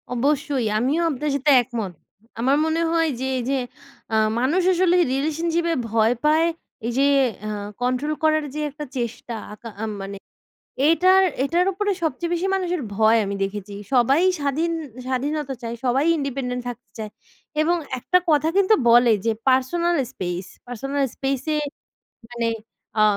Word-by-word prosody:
অবশ্যই 280 -1 0
আমিও 270 +9 +1
আপনার 300 0 -2
সাথে 285 +1 +2
একমত। 230 -6 -5 0.5
আমার 265 +4 +3
মনে 320 +1 0
হয় 330 -1 +2
যে, 260 - -2
এই - - -1
যে, 275 - +1 0.6
আ - - +3 0.2
মানুষ 295 +9 +2
আসলে 360 0 +3 0.2
রিলেশনশিপ 325 +4 0
এ - - 0
ভয় 225 +1 +3
পায় 315 +2 +4 0.4
এই 235 - -1
যে, 275 - +4 0.4
আ - - -3 0.3
কন্ট্রোল 255 +5 0
করার 310 0 +3
যে, - - -3
একটা 295 +1 -7
চেষ্টা 235 0 -4 0.5
আ - - 0 0.2
মানে 195 0 -6 0.7
এটার, 370 +3 +5 0.2
এটার 340 +6 +2
উপরে 410 +2 0
সবচেয়ে 330 +2 -1
বেশি 345 +3 0
মানুষের 360 -3 -1
ভয় 220 +2 +4
আমি 200 0 -3
দেখেছি। 200 +1 -5 0.2
সবাই 265 +5 +4 0.2
স্বাধীন, 295 +4 0 0.3
স্বাধীনতা 275 +2 -2
চায় 235 0 -4
সবাই 265 +4 +2
ইন্ডিপেন্ডেন্ট 260 -3 -3
থাকতে 245 0 -10
চায় 215 -1 -5 0.5
এবং 335 +3 +2 0.2
একটা 360 - +3
কথা 300 0 +3
কিন্তু 395 +2 +5
বলে 240 0 +6
যে, 230 - +3 0.2
পার্সোনাল 340 +7 +2 0.2
স্পেস, 180 -5 -4 0.2
পার্সোনাল 275 +4 -2
স্পেস 270 -1 -1
এ - - +1 0.7
মানে 235 -1 -1 0.5
আ - - +7
275 Hz, 150 wpm, -23 LUFS, 240-320 Hz, 0.7 s, আ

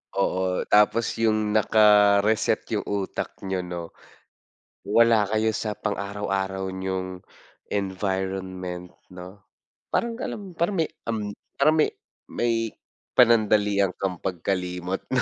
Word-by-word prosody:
Oo, 95 -1 0
tapos 105 +2 +4
yung 110 -2 +2
naka-reset 105 -1 +4
yung - - -1
utak 100 -2 -3
niyo, 95 -1 -2
'no. 90 -2 -6 0.9
Wala 115 0 +4
kayo 110 +2 +1
sa 105 -1 -2
pang-araw-araw 100 -2 -3
niyong 95 -1 -4 0.5
environment, 95 -2 -3 0.2
'no? 90 +2 -11 0.5
Parang 235 -1 0
alam 195 -7 -6
parang 175 +4 +1
may 160 - -1 0.2
um, 110 -3 -2 0.3
parang 155 +3 +4
may 155 - +4 0.4
may 115 -2 -1 0.4
panandalian 105 -5 +4
kang 95 -1 -3
pagkalimot 90 0 -3
no, 130 - +3
100 Hz, 105 wpm, -25 LUFS, 95-110 Hz, 0.9 s, tapos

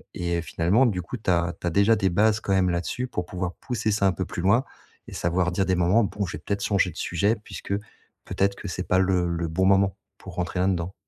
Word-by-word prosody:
et 85 -1 -1
finalement 90 +11 +2
du 90 -5 -1
coup 125 - -6
tu 105 - -4
as 85 0 +1
tu - - -2
as - - 0
déjà 100 +6 +4
des 95 - +1
bases 105 +4 +3
quand 100 - -1
même 95 -1 +3
là-dessus 90 +9 -2
pour 90 -7 -3
pouvoir 90 0 -4
pousser 110 -3 -1
ça 100 -1 +2
un 95 - +2
peu 95 +1 -3
plus 85 - -5
loin 110 +7 +4 0.4
et - - -10
savoir 90 +1 0
dire 95 +2 0
des 95 0 +1
moments: 90 +6 +3
«Bon, 100 +1 -3
je 85 - -5
vais - - -17
peut-être 100 0 -2
changer 100 -3 +2
de - - -18
sujet 100 +6 +1
puisque 100 - -6 0.5
peut-être 100 0 0
que 100 - -8
c'est 90 +1 -4
pas 90 - +3
le 90 -2 +2
le 85 0 -2
bon 95 +4 +1
moment 95 0 +3 0.2
pour 95 -2 -11
rentrer 90 +1 -2
là-dedans». 90 -1 0
95 Hz, 250 wpm, -25 LUFS, 85-100 Hz, 0.5 s, déjà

